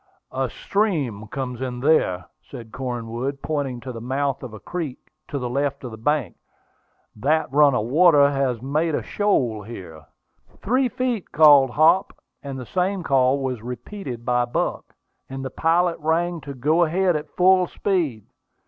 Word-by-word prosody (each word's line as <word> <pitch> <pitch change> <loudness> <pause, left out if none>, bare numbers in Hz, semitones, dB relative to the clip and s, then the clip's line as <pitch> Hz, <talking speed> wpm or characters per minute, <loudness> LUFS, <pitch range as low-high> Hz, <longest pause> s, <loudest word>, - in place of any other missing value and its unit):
"A - - -1
stream 145 - -1
comes 125 0 -5
in 125 -2 -4
there," 125 - +2 0.2
said 115 -2 -11
Cornwood, 125 +1 -4
pointing 140 -5 -2
to 130 - -6
the 115 -2 -8
mouth 135 +3 -1
of 130 - -7
a 110 - -10
creek 160 - -5 0.3
on 140 - -2
the 125 - -3
left 140 +2 -2 0.2
bank; 150 -3 0 0.8
"that 145 +6 0
run 145 -2 +5
of 105 - 0
water 145 +1 +5
has 130 -4 -1
made 155 +3 0
a - - -2
shoal 125 - 0
here." 90 -8 -10 0.5
"Three 255 +4 +1
feet!" 245 -4 -3
called 145 -3 +7
Hop; 160 +8 +3 0.3
and 140 -1 -6
the 125 - -7
same 185 - -1
call 135 -1 +2
was 130 -4 -3
repeated 125 - -7
by 125 0 +2
Buck; 120 - -3 0.3
and 135 0 -6
the 130 - -5
pilot 170 +3 +1
rang 165 +2 0
to 140 -1 -8
go 155 +7 +2
ahead 175 +2 +1
at 150 - -5
full 185 0 +4
speed. 165 - -1
140 Hz, 155 wpm, -23 LUFS, 125-165 Hz, 0.8 s, called